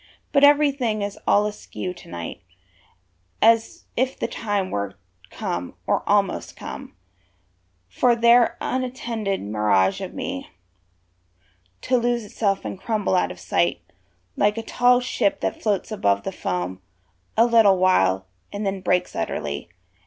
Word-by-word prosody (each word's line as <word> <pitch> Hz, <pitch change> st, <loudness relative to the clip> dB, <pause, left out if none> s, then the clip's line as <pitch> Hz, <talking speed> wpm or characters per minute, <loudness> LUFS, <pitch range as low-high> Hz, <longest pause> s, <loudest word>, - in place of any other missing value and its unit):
But 280 Hz, -, +3 dB
everything 280 Hz, -7 st, +4 dB
is 200 Hz, 0 st, -5 dB
all 205 Hz, +1 st, +4 dB
askew 205 Hz, -3 st, -5 dB
to 175 Hz, -, -15 dB
night, 85 Hz, -1 st, -6 dB, 1.0 s
As 225 Hz, 0 st, +3 dB
if 260 Hz, +2 st, 0 dB
the -, -, -2 dB
time 205 Hz, -4 st, -2 dB
were 100 Hz, -1 st, -3 dB, 0.3 s
come, 90 Hz, 0 st, -4 dB
or -, -, +1 dB
almost -, -, +1 dB
come, -, -, -8 dB, 0.9 s
For 240 Hz, -, +2 dB
their 235 Hz, +1 st, +5 dB
untenanted 240 Hz, -6 st, -2 dB
mirage 105 Hz, -2 st, +1 dB
of -, -, -6 dB
me -, -, -5 dB, 1.3 s
To 255 Hz, -, +2 dB
lose 240 Hz, -1 st, 0 dB
itself 200 Hz, -1 st, -1 dB
and 190 Hz, -, -5 dB
crumble 215 Hz, -4 st, -1 dB
out 180 Hz, -, +2 dB
of 90 Hz, -, -10 dB
sight, 85 Hz, 0 st, 0 dB, 0.6 s
Like 210 Hz, +2 st, +2 dB
a 225 Hz, -, -3 dB
tall 245 Hz, +2 st, +3 dB
ship 290 Hz, +4 st, 0 dB
that -, -, -2 dB
floats 210 Hz, 0 st, -1 dB
above 100 Hz, -, +1 dB
the -, -, -3 dB
foam 90 Hz, +1 st, -3 dB, 0.6 s
A 230 Hz, -, +6 dB
little 225 Hz, -5 st, +5 dB
while, 95 Hz, -, +3 dB, 0.3 s
and 205 Hz, +1 st, -4 dB
then 195 Hz, -1 st, -2 dB
breaks 180 Hz, -1 st, 0 dB
utterly. 75 Hz, +3 st, -3 dB
205 Hz, 140 wpm, -23 LUFS, -, 1.3 s, A